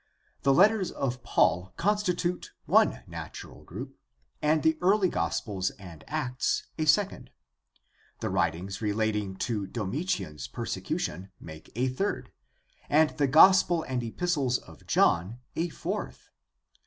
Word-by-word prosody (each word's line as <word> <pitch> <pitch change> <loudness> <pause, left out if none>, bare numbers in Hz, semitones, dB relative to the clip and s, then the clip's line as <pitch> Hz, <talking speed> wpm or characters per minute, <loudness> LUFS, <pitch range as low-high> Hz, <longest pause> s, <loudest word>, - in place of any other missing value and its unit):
The 140 - +3
letters 195 +6 +4
of 125 -2 -3
Paul 90 -4 +1
constitute 180 -3 0
one - - +3
natural - - -9
group, - - -8 0.4
and 155 0 +2
the 160 0 +4
early 190 +1 +4
gospels 95 - -1
and 85 -5 -12
Acts 135 -5 -1 0.2
a 155 - +1
second. 155 -6 +2 0.9
The - - -2
writings 90 +2 -1
relating 105 -2 -1
to 105 -1 -2
Domitian's 115 - -3
persecution 90 +6 -4
make 80 -1 -11
a 125 +3 +1
third, 160 +11 -2 0.6
and 155 +1 +4
the 145 -2 +1
Gospel 175 +3 +6
and 130 -2 -2
Epistles 135 +1 0
of - - -16
John 90 +8 +2 0.2
a 170 +2 -1
fourth. 190 +6 -5
130 Hz, 120 wpm, -28 LUFS, -, 0.9 s, Gospel